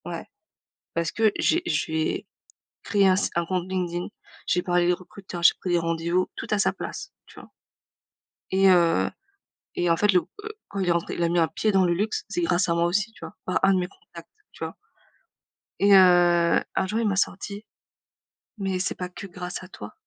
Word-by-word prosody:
Ouais. - - -6 0.7
Parce 170 -1 0
que 220 -2 +2
j'ai 340 +2 +2
j'ai 160 - -1 0.6
créé 200 -2 +3
un 185 - +4
si 200 - 0
un 170 - +1
compte 185 0 -2
LinkedIn, 180 -2 -2 0.4
j'ai 180 - +1
parlé 175 -1 +1
à - - +1
des 175 - +4
recruteurs, 185 0 -8
j'ai 170 - +7
pris 185 - -3
des 175 - +3
rendez-vous, 170 +2 0
tout - - -5
à 210 - +2
sa 205 - +2
place, 390 - -7
tu - - -14
vois - - -15 1.0
et 195 +1 +4
heu 175 -2 +4 0.7
et 175 - 0
en 165 - +4
fait 210 +3 +3
le, 180 - +5 0.2
heu, - - -4 0.2
quand 200 - -5
il 185 - 0
est - - +5
rentré, 170 0 -2
il - - -3
a 170 - +2
mis 175 - +1
un 165 -1 +3
pied 210 +7 0
dans 190 -1 +4
le 175 -1 +2
luxe, 210 +5 -2
c'est 190 -4 -2
grâce 175 +2 +1
à 170 - +2
moi 170 0 +1
aussi, 205 +6 0
tu - - -19
vois, - - -9
par 185 - +1
un 195 - +5
de - - +2
mes 180 0 -2
contacts, 405 - -15 0.2
tu - - -6
vois - - -7 1.0
et 200 +1 +4
heu, 175 -2 +5
un - - +1
jour 215 +4 -1
il 230 - +1
m'a 200 - 0
sorti: 200 +2 -2 0.9
«Mais 195 -2 -2
c'est 180 - -2
pas 180 -1 -5
que 190 +2 -9
grâce 180 0 -7
à - - -10
toi». 105 - -10
180 Hz, 220 wpm, -25 LUFS, 175-195 Hz, 1.0 s, j'ai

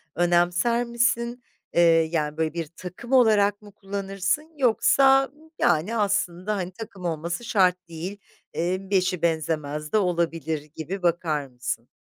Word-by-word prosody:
önemser 175 +7 +2
misin? 235 0 0 0.3
Eee, 170 - +4 0.3
yani, 150 -2 -1
böyle, 160 -1 0
bir 165 -3 -3
takım 185 +8 -9
olarak 215 -5 +4
mı 205 -1 -14
kullanırsın, 195 - -3
yoksa, 270 +2 +4 0.3
yani, 175 +8 +2
aslında, 200 -1 0
hani, 185 -1 -3
takım 195 -2 -9
olması 170 +6 -3
şart 185 -4 +2
değil, 175 +5 -6 0.4
eee, 185 +3 -2
eşi 185 -3 +1
benzemez 155 -2 -1
de 215 - +3
olabilir, 165 -4 0
gibi 180 +5 -5
bakar 160 -4 0
mısın? 125 -1 -5
180 Hz, 130 wpm, -25 LUFS, 165-210 Hz, 0.4 s, Eee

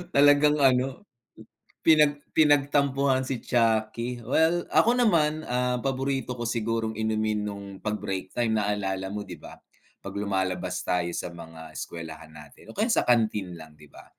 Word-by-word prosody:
Talagang 145 +1 +5
ano, 135 +7 +2 0.8
pinag 150 -2 +4
pinagtampuhan 140 -3 +3
si 130 -3 -4
chuckie. 115 +1 0
Well, 165 +5 +2
ako 235 +2 +4
naman, 155 -7 +2
ah, 125 0 0
paborito 135 -1 -2
ko 120 - -4
sigurong 115 -1 -1
inumin 110 -1 0
no'ng 100 -1 -6 0.2
pag-break 95 -3 -3
time 115 -2 +1
naalala 95 -2 -2
mo 105 0 -4
di - - -7
ba, - - -12 0.4
'pag - - -8
lumalabas 95 -2 -2
tayo 85 -1 0
sa - - -4
mga 80 -2 -11
eskuwelahan 80 -2 -8
natin 75 +8 -14
o - - -17
kaya 220 - +2
sa - - +3
kantin 110 -7 +1
lang 80 -1 -13
di 75 -1 -17
ba, - - -14
115 Hz, 150 wpm, -26 LUFS, 95-140 Hz, 0.8 s, Talagang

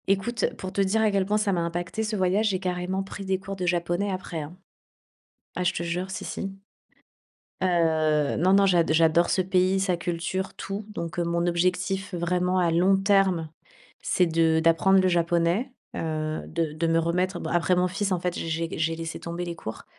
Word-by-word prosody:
Écoute, 200 +5 +1
pour 185 0 -6
te 200 - +1
dire 195 +3 +2
à 215 -1 +3
quel 195 -1 +1
point 210 +1 +2
ça 210 -2 +1
m'a 175 - 0
impacté 170 +5 -3
ce 215 0 -2
voyage, 195 +3 +2
j'ai 190 -2 -1
carrément 180 +1 -2
pris 195 +1 -8
des 190 0 0
cours 195 0 -6
de 180 -2 -3
japonais 175 +3 0
après, 185 -3 -4
hein. 155 +5 -9 1.0
Ah, 180 - -1
je 175 - +1
te - - -3
jure, 180 +3 -3
si, 195 - -5
si. 195 - -4 1.1
Heu, 160 -4 +2
non, 185 +3 +3
non, 200 0 +5
j'ad 175 -4 +3
j'adore 165 +1 +4
ce 190 - +2
pays, 185 +1 +2
sa 190 -2 +1
culture, 175 +2 -3
tout, 195 +2 -5
donc 170 -5 -5
heu, - - +2
mon 170 0 0
objectif 180 +3 0
vraiment, 180 +2 0
à 175 -2 +2
long 185 +4 +4
terme, 195 -4 +2 0.5
c'est 180 - +2
de 165 -1 +2
d'apprendre 165 +4 +4
le 185 - +3
japonais, 175 +7 +1 0.2
heu, 155 -1 -2
de 165 -2 -2
de 165 +2 -1
me 165 0 +2
remettre 180 +3 0
bon, 160 - -4
après 175 +1 +2
mon 180 0 +2
fils 195 +2 -2
en 185 - +1
fait, 180 0 -2
j'ai - - -4
j'ai 165 +1 -1
gu - - -7
j'ai 160 +1 0
laissé 165 0 -5
tomber 170 +1 -5
les 170 -1 -5
cours. 110 -8 -7
180 Hz, 205 wpm, -26 LUFS, 170-190 Hz, 1.1 s, non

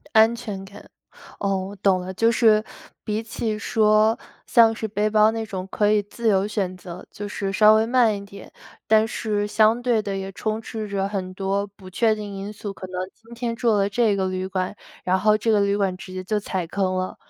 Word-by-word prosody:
安 220 +2 +6
全 210 -5 -6
感， 200 +2 -13 0.5
哦， 195 -1 0
我 200 +1 -9
懂 190 -1 +2
了， 185 +1 -6
就 230 +4 +3
是 220 -2 +4 0.4
比 215 0 -2
起 220 -1 -3
说 215 0 +3 0.3
像 230 -1 +5
是 220 0 -4
背 210 +1 -1
包 215 0 +4
那 225 0 -3
种 190 -3 -5
可 210 0 +2
以 215 - +4
自 225 +3 -3
由 195 -1 +3
选 195 -3 -2
择， 180 0 -9
就 205 - -7
是 195 -1 -3
稍 215 +2 +6
微 220 +1 +3
慢 235 -3 +3
一 200 - -8
点， 200 0 -12 0.4
但 220 0 +4
是 210 -2 -2
相 220 +3 +3
对 240 -3 +2
地 200 -2 -4
也 195 0 -4
充 215 +3 -3
斥 220 -3 -6
着 195 -1 -1
很 185 -2 -4
多 195 +1 -1
不 195 -2 -14
确 220 +3 +2
定 210 -1 -7
因 195 +2 -6
素， 205 -1 -6
可 185 -1 -9
能 185 - -12 0.2
今 230 +1 -15
天 235 0 -3
住 235 -1 +1
了 200 -1 +2
这 210 0 +2
个 190 -1 0
旅 185 0 -3
馆， 185 +1 -2 0.3
然 185 +1 +1
后 215 +2 +4
这 225 +2 0
个 210 -2 +4
旅 200 0 +2
馆 195 -2 0
直 185 0 -10
接 185 - -5
就 210 +3 -1
踩 190 -3 -3
坑 190 -1 -1
了。 185 0 -3
205 Hz, 240 characters per minute, -23 LUFS, 195-220 Hz, 0.5 s, 安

